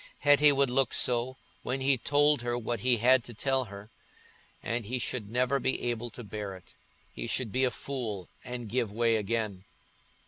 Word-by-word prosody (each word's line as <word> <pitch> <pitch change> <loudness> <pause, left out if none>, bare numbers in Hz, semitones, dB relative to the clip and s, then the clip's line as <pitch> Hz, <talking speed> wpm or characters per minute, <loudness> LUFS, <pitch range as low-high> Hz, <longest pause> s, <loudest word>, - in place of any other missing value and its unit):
Hetty 145 +1 +6
would 140 -2 +2
look 135 +1 +2
so, 125 +1 +1 0.2
when 130 +2 -2
he 135 +1 +3
told 145 +2 +2
her 120 0 -1
what 120 -1 -3
he 125 +3 +3
had 125 +2 +4
to 120 - -10
tell 135 +2 0
her; 100 0 -11 0.7
and 115 +1 -2
he 125 +3 -1
should 120 -3 -3
never 125 +4 +1
be 130 +1 0
able 120 0 -2
to 120 +2 -9
bear 105 -2 -6
it—he 95 +5 -12
should 115 -1 -1
be 130 +3 +2
a - - +2
fool 115 -7 -5 0.2
and 125 -2 -6
give 115 -1 -1
way 115 +1 +2
again. 105 -3 -2
120 Hz, 180 wpm, -29 LUFS, 110-130 Hz, 0.7 s, Hetty